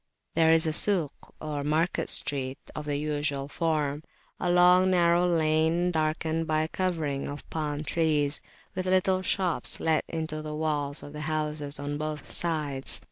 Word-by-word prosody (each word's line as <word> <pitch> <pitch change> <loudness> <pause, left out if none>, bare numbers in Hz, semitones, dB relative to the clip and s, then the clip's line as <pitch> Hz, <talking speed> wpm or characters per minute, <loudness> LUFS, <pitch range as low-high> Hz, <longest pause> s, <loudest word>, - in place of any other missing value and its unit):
There 160 0 +4
is 165 0 +5
a 160 - 0
"Suk," 170 -4 +2 0.3
or 150 -2 -4
market 155 +4 0
street 135 -2 +1 0.2
of 150 - -6
the 145 -1 -1
usual 145 -2 -2
form, 150 -2 -1 0.4
a 180 - -1
long 180 +1 +5
narrow 175 -1 +3
lane 160 +1 +2
darkened 160 0 -1
by 155 0 +1
a - - -2
covering 160 -6 -2
of 145 +1 -7
palm 150 -2 -2
leaves, 150 -3 +2 0.3
with 185 0 -3
little 185 0 +2
shops 185 -2 +1
let 160 -1 +1
into 160 -1 -4
the 155 0 -5
walls 150 -2 -2
of 145 - -10
the 150 - -6
houses 150 -2 -2
on 145 +1 -4
both 155 -1 -4
sides. 150 -5 +1
155 Hz, 160 wpm, -27 LUFS, 150-170 Hz, 0.4 s, is